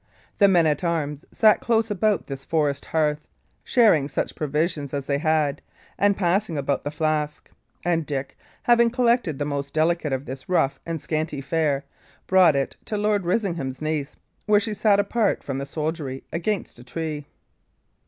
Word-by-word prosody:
The 200 - +7
men 175 -4 +4
at 150 +2 +1
arms 155 -3 -2
sat 215 -1 +5
close 225 -2 +1
about 210 0 +1
this 135 -1 -7
forest 145 -2 0
hearth, 150 -2 0 0.4
sharing 210 - +4
such - - -2
provisions 150 -1 -1
as 140 -1 -3
they 140 0 0
had, 155 -2 +1 0.3
and 200 0 +2
passing 180 -2 +1
about 140 -1 -1
the - - -2
flask; 150 -1 -2 0.3
and 170 -2 +1
Dick, 140 -2 -4 0.3
having 235 -1 +5
collected 235 - +1
the 145 - -2
most 140 -1 -4
delicate 160 -1 +1
of 135 +1 -2
the 130 0 -7
rough 175 -7 +1
and 165 -1 -2
scanty 155 -1 -2
fare, 140 -1 0 0.4
brought 185 -5 +5
it 135 -1 -1
to 210 - -3
Lord 205 -2 +1
Risingham's 170 - -1
niece, 155 -2 -3 0.3
where 210 -1 +5
she 215 +1 -3
sat 205 -1 +3
apart 205 +1 +1
from 135 -1 -3
the 140 - -5
soldiery 150 -4 -4
against 180 - -2
a - - -11
tree. 150 +3 -5
155 Hz, 165 wpm, -24 LUFS, 145-195 Hz, 0.4 s, The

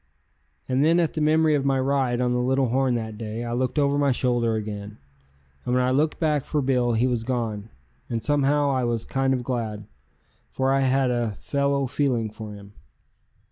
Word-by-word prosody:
And 130 +2 +1
then 165 +3 +4
at 165 -2 +1
the 155 - -2
memory 155 +1 +3
of 145 -2 +1
my 135 -1 +1
ride 130 -2 +1
on 125 -1 +1
the 125 - +1
Little 130 +1 +1
Horn 130 0 +1
that 110 -2 -5
day 110 +1 -5
I 120 0 -4
looked 130 +4 -1
over 145 0 +2
my 140 -1 +3
shoulder 120 -2 +1
again, 105 -1 -5 0.7
and 125 - -1
when 125 - +3
I 125 - +1
looked 150 +4 +1
back 150 -4 +1
for 150 - -2
Bill 125 -3 +1
he 115 +2 +2
was 120 -3 0
gone, 115 -4 -3 0.4
and 115 -2 -3
somehow 145 0 +2
I 130 -2 0
was 120 -2 -1
kind 135 0 0
of 130 -2 0
glad, 110 -4 -3 0.6
for 135 0 0
I 135 - +2
had 135 -1 +2
a 120 -3 -1
fellow 140 -1 0
feeling 125 -5 -1
for 105 -1 -8
him. 100 0 -13
130 Hz, 200 wpm, -24 LUFS, 115-140 Hz, 0.7 s, then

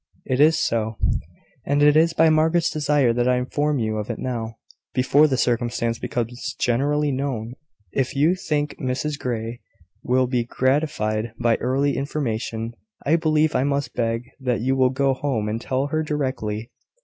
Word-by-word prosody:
"It 130 - -1
is 155 +2 +6
so: 110 -6 0 0.7
and 145 +1 +2
it 150 0 +6
is 165 +1 +4
by 160 0 +4
Margaret's 160 +2 +3
desire 145 -5 +2
that 120 +1 +1
I 125 - +4
inform 145 +4 0
you 110 -3 -1
of 105 +1 -4
it 120 - -3
now, 115 -3 -4 0.4
before 140 +4 +4
the 135 -3 0
circumstance 120 -1 0
becomes 120 0 -3
generally 145 +4 +1
known. 130 -4 -3 0.4
If 135 -1 -1
you 150 +5 +4
think 150 -5 -2
Mrs 140 +3 -2
Grey 115 -1 -4 0.4
will 130 +1 +2
be 125 -1 0
gratified 120 -4 0
by 120 -1 +2
early 135 +3 0
information, 115 -5 -3 0.3
I 155 - +4
believe 155 -1 +2
I 125 - +2
must 140 -2 -1
beg 115 0 -1 0.2
that 125 -4 -1
you 130 +2 +1
will 130 -1 +4
go 135 +1 +1
home 130 -6 -2
and 110 +2 -2
tell 130 +1 -1
her 155 +2 0
directly. 130 -7 -3
130 Hz, 165 wpm, -23 LUFS, 115-145 Hz, 0.7 s, is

